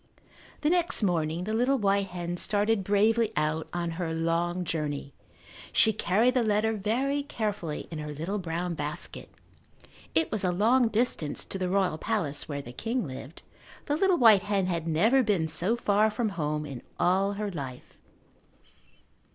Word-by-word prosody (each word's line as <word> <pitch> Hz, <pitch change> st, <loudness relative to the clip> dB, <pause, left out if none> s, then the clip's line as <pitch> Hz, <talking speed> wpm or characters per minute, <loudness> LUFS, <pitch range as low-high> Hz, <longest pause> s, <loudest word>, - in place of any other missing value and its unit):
The 300 Hz, +1 st, +2 dB
next 345 Hz, -9 st, +2 dB
morning 170 Hz, -2 st, 0 dB
the 215 Hz, +3 st, -3 dB
little 250 Hz, +5 st, +2 dB
white 200 Hz, -3 st, +1 dB
hen 175 Hz, -1 st, -4 dB
started 205 Hz, +2 st, +1 dB
bravely 215 Hz, +3 st, +2 dB
out 155 Hz, +1 st, 0 dB
on 170 Hz, -1 st, -2 dB
her 160 Hz, -2 st, -2 dB
long 170 Hz, +2 st, 0 dB
journey. 150 Hz, -4 st, -3 dB, 0.6 s
She 220 Hz, -, +4 dB
carried 215 Hz, +5 st, +2 dB
the 255 Hz, -, +2 dB
letter 215 Hz, 0 st, +1 dB
very 245 Hz, +8 st, 0 dB
carefully 210 Hz, -, -4 dB
in 160 Hz, -, -5 dB
her 150 Hz, 0 st, -5 dB
little 165 Hz, +8 st, -3 dB
brown 175 Hz, 0 st, -3 dB
basket. 150 Hz, -1 st, -5 dB, 0.9 s
It 160 Hz, -1 st, +2 dB
was 210 Hz, -3 st, 0 dB
a 180 Hz, -, +2 dB
long 230 Hz, +7 st, +3 dB
distance 220 Hz, -9 st, -1 dB
to 195 Hz, -, -6 dB
the 185 Hz, -1 st, -1 dB
royal 185 Hz, -4 st, +1 dB
palace 160 Hz, -11 st, -1 dB
where 140 Hz, -1 st, -4 dB
the 120 Hz, -, -9 dB
king 230 Hz, -, -2 dB
lived. 135 Hz, +3 st, -9 dB, 0.4 s
The 290 Hz, -, 0 dB
little 375 Hz, +2 st, +3 dB
white 220 Hz, -, +7 dB
hen 200 Hz, -1 st, 0 dB
had 170 Hz, -3 st, -2 dB
never 220 Hz, +12 st, +4 dB
been 200 Hz, -9 st, +1 dB
so 180 Hz, +8 st, 0 dB
far 215 Hz, -2 st, +2 dB
from 220 Hz, +1 st, -1 dB
home 150 Hz, -5 st, -2 dB
in 135 Hz, -4 st, -7 dB, 0.2 s
all 195 Hz, +3 st, +2 dB
her 205 Hz, 0 st, -3 dB
life. 135 Hz, -7 st, -7 dB
195 Hz, 165 wpm, -28 LUFS, 160-220 Hz, 0.9 s, white